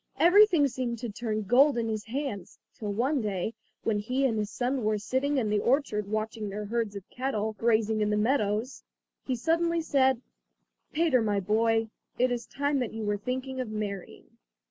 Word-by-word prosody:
Everything 355 Hz, -4 st, +6 dB
seemed 245 Hz, -2 st, -3 dB
to 240 Hz, +1 st, -5 dB
turn 215 Hz, 0 st, -3 dB
to -, -, -14 dB
gold 265 Hz, +3 st, +5 dB
in 230 Hz, -1 st, 0 dB
his 215 Hz, -1 st, -3 dB
hands, 245 Hz, -6 st, -4 dB, 0.2 s
till 210 Hz, -4 st, -4 dB
one 255 Hz, +7 st, +1 dB
day, 205 Hz, 0 st, -2 dB, 0.3 s
when 215 Hz, -2 st, +1 dB
he 255 Hz, +6 st, 0 dB
and 225 Hz, -4 st, +1 dB
his 210 Hz, -1 st, -2 dB
son 250 Hz, +2 st, -1 dB
were 215 Hz, 0 st, +1 dB
sitting 260 Hz, +7 st, 0 dB
in 235 Hz, -5 st, +1 dB
the 210 Hz, -, +2 dB
orchard 235 Hz, -5 st, +1 dB
watching 215 Hz, 0 st, -3 dB
their 210 Hz, +1 st, -5 dB
herds 225 Hz, -1 st, -2 dB
of 200 Hz, -2 st, -8 dB
cattle 220 Hz, -4 st, -2 dB
grazing 220 Hz, -1 st, +2 dB
in 210 Hz, -, +2 dB
the 210 Hz, -, +1 dB
meadows, 215 Hz, +1 st, 0 dB, 0.5 s
he 260 Hz, -, 0 dB
suddenly 335 Hz, +5 st, +1 dB
said: 265 Hz, -5 st, +2 dB, 0.7 s
"Peter, 315 Hz, -6 st, +3 dB
my 205 Hz, -2 st, +1 dB
boy, 225 Hz, +3 st, +2 dB, 0.3 s
it 250 Hz, 0 st, +2 dB
is 240 Hz, -1 st, -3 dB
time 285 Hz, 0 st, 0 dB
that 245 Hz, -4 st, -2 dB
you 225 Hz, 0 st, -4 dB
were 205 Hz, 0 st, +1 dB
thinking 260 Hz, +4 st, -4 dB
of 250 Hz, -, -5 dB
marrying." 205 Hz, -3 st, -5 dB
230 Hz, 190 wpm, -28 LUFS, 210-265 Hz, 0.7 s, Everything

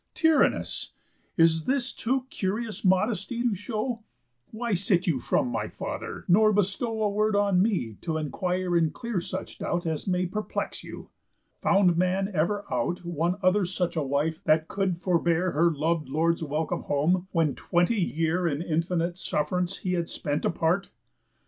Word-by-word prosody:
tyrannous! 320 Hz, -2 st, +2 dB, 0.4 s
In 165 Hz, -1 st, +7 dB, 0.2 s
this 265 Hz, -1 st, 0 dB
too 255 Hz, +2 st, -1 dB
curious 215 Hz, +3 st, -3 dB
modesty 195 Hz, +4 st, +1 dB
you 235 Hz, -1 st, +1 dB
show. 225 Hz, +4 st, -3 dB, 0.5 s
Why 230 Hz, 0 st, -3 dB
sit 185 Hz, -1 st, +2 dB
you 155 Hz, -7 st, +1 dB
from 125 Hz, -, +1 dB
my -, -, -2 dB
father, -, -, -6 dB
nor 215 Hz, +4 st, +5 dB
bestow 210 Hz, +3 st, 0 dB
A 210 Hz, -, +2 dB
word 215 Hz, +1 st, +1 dB
on 200 Hz, -3 st, +3 dB
me 180 Hz, -, 0 dB
t' 160 Hz, -2 st, -2 dB
enquire 180 Hz, +4 st, -1 dB
and 165 Hz, -2 st, +3 dB
clear 235 Hz, -6 st, -3 dB
such -, -, -6 dB
doubt 175 Hz, 0 st, -2 dB
As 160 Hz, +1 st, -2 dB
may 180 Hz, -1 st, +1 dB
perplex 210 Hz, +4 st, -4 dB
you? -, -, -9 dB, 0.5 s
Found 185 Hz, -4 st, +4 dB
man 190 Hz, +3 st, +1 dB
ever 200 Hz, +5 st, 0 dB
out 175 Hz, +9 st, -1 dB
One 170 Hz, +1 st, 0 dB
other 185 Hz, +2 st, +4 dB
such 180 Hz, -1 st, -2 dB
a 160 Hz, -, +1 dB
wife 145 Hz, +3 st, -1 dB
that 155 Hz, +1 st, +3 dB
could 195 Hz, -3 st, -1 dB
forbear 175 Hz, 0 st, +1 dB
Her 170 Hz, +3 st, +3 dB
lov'd 155 Hz, -1 st, -1 dB
lord's 165 Hz, +4 st, +1 dB
welcome 155 Hz, +1 st, -2 dB
home, 175 Hz, +6 st, +1 dB
when 160 Hz, -5 st, +2 dB
twenty 175 Hz, +5 st, +1 dB
year 170 Hz, +1 st, 0 dB
In 145 Hz, -3 st, -1 dB
infinite 170 Hz, +1 st, -1 dB
suff'rance 180 Hz, +5 st, -1 dB
he 180 Hz, -, 0 dB
had 170 Hz, -1 st, -1 dB
spent 145 Hz, -2 st, -2 dB
apart. 175 Hz, +4 st, +1 dB
180 Hz, 160 wpm, -27 LUFS, 165-205 Hz, 0.5 s, In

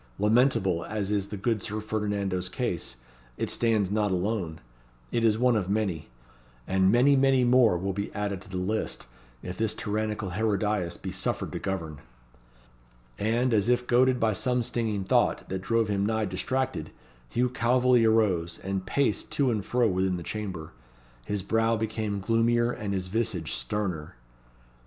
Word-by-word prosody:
Lamentable 105 Hz, -5 st, +3 dB
as 105 Hz, -2 st, -3 dB
is 100 Hz, -2 st, 0 dB
the 105 Hz, -, -6 dB
good 110 Hz, +1 st, 0 dB
Sir 105 Hz, +3 st, -3 dB
Ferdinando's 100 Hz, -4 st, -2 dB
case, 90 Hz, -, -3 dB, 0.4 s
it -, -, -1 dB
stands 110 Hz, -5 st, +1 dB
not 105 Hz, 0 st, +1 dB
alone. 90 Hz, -3 st, -2 dB, 0.5 s
It 115 Hz, -, 0 dB
is 110 Hz, -2 st, +4 dB
one 125 Hz, 0 st, +3 dB
of 100 Hz, -4 st, -1 dB
many. 95 Hz, -9 st, -1 dB, 0.6 s
And 95 Hz, 0 st, +3 dB
many, 130 Hz, +5 st, +5 dB
many 135 Hz, -1 st, +4 dB
more 120 Hz, -6 st, +5 dB
will 95 Hz, +2 st, -2 dB
be 100 Hz, +2 st, -4 dB
added 100 Hz, -2 st, -2 dB
to -, -, -13 dB
the 95 Hz, -, -4 dB
list, 100 Hz, +4 st, -2 dB, 0.4 s
if 90 Hz, +2 st, -6 dB
this 110 Hz, -1 st, 0 dB
tyrannical 105 Hz, -2 st, -2 dB
Herodias 105 Hz, -3 st, 0 dB
be 95 Hz, -, -6 dB
suffered 95 Hz, -, -2 dB
to -, -, -4 dB
govern." 85 Hz, -7 st, -4 dB, 1.2 s
And 115 Hz, +4 st, +1 dB
as 110 Hz, +1 st, +2 dB
if 125 Hz, 0 st, +2 dB
goaded 125 Hz, +1 st, +3 dB
by 110 Hz, -1 st, +2 dB
some 125 Hz, +4 st, 0 dB
stinging 110 Hz, -4 st, -1 dB
thought, -, -, +1 dB
that 95 Hz, 0 st, -3 dB
drove 115 Hz, +2 st, +1 dB
him 100 Hz, -1 st, 0 dB
nigh 110 Hz, +1 st, +1 dB
distracted, 130 Hz, +8 st, -2 dB, 0.4 s
Hugh 125 Hz, +1 st, +1 dB
Calveley 125 Hz, 0 st, +3 dB
arose, 95 Hz, -7 st, +2 dB
and 95 Hz, 0 st, -2 dB
paced 140 Hz, +6 st, 0 dB
to 135 Hz, -3 st, +2 dB
and 105 Hz, -3 st, -1 dB
fro 120 Hz, +2 st, +2 dB
within 95 Hz, -2 st, 0 dB
the 85 Hz, -, -6 dB
chamber. 95 Hz, -6 st, -5 dB, 0.5 s
His 100 Hz, -2 st, -2 dB
brow 115 Hz, +3 st, +2 dB
became 110 Hz, -2 st, -2 dB
gloomier 120 Hz, +2 st, +2 dB
and 105 Hz, -5 st, -3 dB
his 90 Hz, -1 st, -3 dB
visage 105 Hz, -5 st, -1 dB
sterner. 80 Hz, +3 st, -3 dB
105 Hz, 160 wpm, -27 LUFS, 95-115 Hz, 1.2 s, many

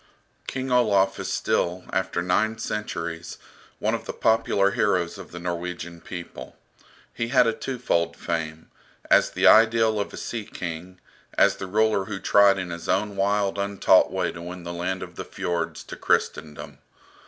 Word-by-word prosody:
King 130 Hz, 0 st, -3 dB
Olaf 100 Hz, -6 st, +3 dB
is -, -, -3 dB
still, 90 Hz, +1 st, 0 dB
after 95 Hz, -2 st, -1 dB
nine 110 Hz, +5 st, +1 dB
centuries, 85 Hz, -7 st, -4 dB, 0.4 s
one -, -, 0 dB
of -, -, -3 dB
the -, -, -5 dB
popular 100 Hz, -3 st, +2 dB
heroes 90 Hz, -4 st, 0 dB
of -, -, -10 dB
the 85 Hz, -, -8 dB
Norwegian 85 Hz, -1 st, -5 dB
people. 85 Hz, -2 st, -8 dB, 0.6 s
He 115 Hz, -, -2 dB
had 125 Hz, 0 st, +4 dB
a 115 Hz, -, +2 dB
twofold 85 Hz, -12 st, -1 dB
fame, 80 Hz, -1 st, -4 dB, 0.4 s
as -, -, +5 dB
the -, -, -1 dB
ideal 110 Hz, -1 st, +5 dB
of 100 Hz, -, -3 dB
a -, -, -9 dB
sea 115 Hz, -3 st, -5 dB
king, 90 Hz, -2 st, -7 dB, 0.4 s
as -, -, +4 dB
the 95 Hz, -, -6 dB
ruler 110 Hz, 0 st, +2 dB
who 100 Hz, -1 st, -5 dB
tried 100 Hz, 0 st, +5 dB
in 90 Hz, -2 st, -4 dB
his 85 Hz, 0 st, -7 dB
own 105 Hz, -1 st, 0 dB
wild 100 Hz, 0 st, +1 dB
untaught 100 Hz, -1 st, +3 dB
way 95 Hz, -2 st, -1 dB
to 85 Hz, -, -9 dB
win 90 Hz, +1 st, -8 dB
the 85 Hz, 0 st, -5 dB
land 90 Hz, +2 st, -3 dB
of -, -, -11 dB
the -, -, -4 dB
Fiords 85 Hz, -1 st, -3 dB
to -, -, -9 dB
Christendom. 75 Hz, -1 st, -2 dB
95 Hz, 165 wpm, -25 LUFS, 85-105 Hz, 0.6 s, as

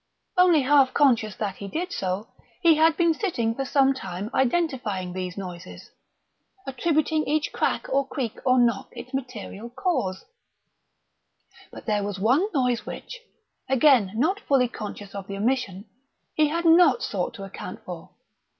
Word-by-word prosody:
Only 360 Hz, -4 st, +5 dB
half 270 Hz, -1 st, +4 dB
conscious 230 Hz, -8 st, +3 dB
that 200 Hz, -3 st, -4 dB
he 200 Hz, -, -7 dB
did 345 Hz, -, -4 dB
so, 190 Hz, +3 st, -3 dB, 0.3 s
he 335 Hz, -1 st, +7 dB
had 320 Hz, +1 st, +3 dB
been 335 Hz, -2 st, +3 dB
sitting 245 Hz, -, -1 dB
for 270 Hz, +3 st, -3 dB
some 270 Hz, 0 st, +3 dB
time 205 Hz, -4 st, -6 dB
identifying 250 Hz, -, 0 dB
these 185 Hz, 0 st, -5 dB
noises, 180 Hz, -3 st, -9 dB, 0.7 s
attributing 310 Hz, +3 st, 0 dB
to -, -, -6 dB
each 305 Hz, +1 st, 0 dB
crack -, -, 0 dB
or 275 Hz, 0 st, 0 dB
creak 260 Hz, -5 st, -4 dB
or 255 Hz, 0 st, +3 dB
knock 235 Hz, -4 st, +2 dB
its 250 Hz, +3 st, -10 dB
material 240 Hz, -4 st, -6 dB
cause; 245 Hz, -, -2 dB, 1.5 s
but -, -, -11 dB
there 210 Hz, -2 st, +1 dB
was 200 Hz, -1 st, -4 dB
one 255 Hz, -, +2 dB
noise 250 Hz, -5 st, 0 dB
which, -, -, -8 dB, 0.5 s
again 255 Hz, -7 st, +4 dB
not 330 Hz, -, +1 dB
fully 270 Hz, -8 st, +2 dB
conscious 205 Hz, -3 st, -8 dB
of 200 Hz, -1 st, -7 dB
the 195 Hz, -, -5 dB
omission, 210 Hz, -3 st, -1 dB, 0.5 s
he 305 Hz, -1 st, +3 dB
had 335 Hz, +3 st, -2 dB
not 330 Hz, -6 st, +5 dB
sought 185 Hz, -4 st, -2 dB
to 195 Hz, -, -8 dB
account 185 Hz, -1 st, -8 dB
for. 175 Hz, -3 st, -8 dB
250 Hz, 155 wpm, -25 LUFS, 200-300 Hz, 1.5 s, he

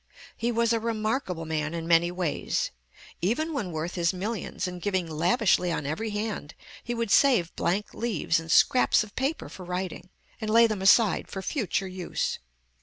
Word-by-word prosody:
He 235 Hz, +1 st, -1 dB
was 235 Hz, 0 st, +2 dB
a 230 Hz, -, +1 dB
remarkable 220 Hz, -5 st, -2 dB
man 155 Hz, 0 st, -2 dB
in 165 Hz, 0 st, -4 dB
many 170 Hz, 0 st, +4 dB
ways. 175 Hz, -4 st, -2 dB, 0.5 s
Even 310 Hz, -, 0 dB
when 220 Hz, -11 st, -3 dB
worth 160 Hz, +2 st, -3 dB
his 170 Hz, 0 st, +1 dB
millions, 200 Hz, -1 st, -3 dB
and 180 Hz, -1 st, -6 dB
giving 190 Hz, -2 st, 0 dB
lavishly 175 Hz, +3 st, +2 dB
on 150 Hz, -, -2 dB
every 160 Hz, +10 st, -2 dB
hand, 205 Hz, -7 st, -4 dB, 0.3 s
he 240 Hz, -, -3 dB
would 230 Hz, -3 st, -2 dB
save 230 Hz, -13 st, +4 dB
blank 190 Hz, +5 st, -1 dB
leaves 200 Hz, -8 st, 0 dB
and 165 Hz, 0 st, -6 dB
scraps 255 Hz, -1 st, +5 dB
of 215 Hz, 0 st, -13 dB
paper 275 Hz, +5 st, -1 dB
for 185 Hz, -, -10 dB
writing, 180 Hz, 0 st, -4 dB, 0.3 s
and 215 Hz, -, -3 dB
lay 230 Hz, +2 st, +6 dB
them 215 Hz, -4 st, -1 dB
aside 205 Hz, +2 st, +4 dB
for 190 Hz, -, -6 dB
future 195 Hz, -, -1 dB
use. 185 Hz, -1 st, -3 dB
190 Hz, 175 wpm, -27 LUFS, 170-230 Hz, 0.5 s, lay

